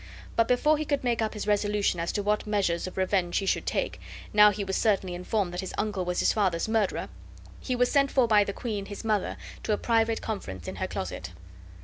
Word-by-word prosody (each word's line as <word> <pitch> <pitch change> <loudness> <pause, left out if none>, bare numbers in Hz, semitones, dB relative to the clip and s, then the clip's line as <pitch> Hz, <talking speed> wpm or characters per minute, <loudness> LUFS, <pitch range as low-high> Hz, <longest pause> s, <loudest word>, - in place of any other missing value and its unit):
But 230 0 +3
before 295 +5 +3
he 310 - -2
could 285 -2 -1
make 240 -2 +1
up 220 0 -1
his 210 - -4
resolution 205 -3 +1
as 170 - -1
to 205 - -1
what 210 +1 0
measures 195 -5 0
of 185 - -9
revenge 185 -2 +1
he 195 - 0
should - - 0
take, - - -2 0.3
now 210 0 +8
he 205 0 -3
was 190 -1 -2
certainly 195 -5 +1
informed 180 +1 -1
that 180 - -2
his 190 - -6
uncle 205 -4 -1
was 180 0 0
his - - +3
father's 190 -5 +1
murderer, 220 -3 0 0.5
he 255 - -2
was 245 0 +2
sent 275 -1 +3
for 260 -3 +3
by 210 -2 +5
the 200 - -3
queen 205 -2 -4
his 205 +2 -8
mother, 215 -3 0 0.2
to 215 - 0
a - - +1
private 225 -1 +1
conference 95 - -5
in - - -5
her - - -2
closet. 85 - -5
210 Hz, 230 wpm, -27 LUFS, 190-225 Hz, 0.5 s, now